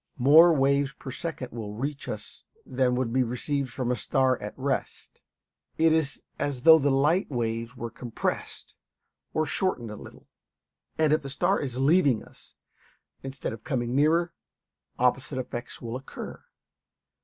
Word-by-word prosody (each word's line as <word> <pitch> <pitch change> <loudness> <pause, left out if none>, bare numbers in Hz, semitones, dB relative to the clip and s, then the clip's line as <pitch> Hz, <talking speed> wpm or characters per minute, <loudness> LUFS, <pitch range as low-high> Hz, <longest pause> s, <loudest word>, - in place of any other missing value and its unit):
More 155 +7 +7
waves 140 -1 +2
per 135 - -9
second 140 -3 -5
will 110 -3 -6
reach 140 +5 -4
us - - -8 0.2
than 125 -2 +1
would 125 -2 -1
be 130 - +3
received 130 +3 -2
from 125 -1 -2
a - - +1
star 130 -1 +1
at 105 - -7
rest. 135 +1 -4 0.6
It 160 0 +4
is 155 -4 -1 0.2
as 140 -3 -2
though 160 -1 +9
the 140 0 +2
light 150 +7 +2
waves 115 -1 -3
were 115 -1 -5
compressed 120 0 -4 0.6
or 155 - 0
shortened 130 - -2
a - - -6
little. - - -13 0.7
And 155 -1 +3
if 155 - +2
the 140 - -7
star 175 +8 +1
is 130 -4 -4
leaving 140 -3 +3
us, - - -17 0.7
instead 135 -3 -5
of 115 0 -10
coming 125 -4 -2
nearer, 165 +4 +3 0.6
opposite 130 +3 +1
effects 125 -1 -6
will 115 0 -4
occur. 130 +1 -8
135 Hz, 155 wpm, -27 LUFS, 125-150 Hz, 0.7 s, though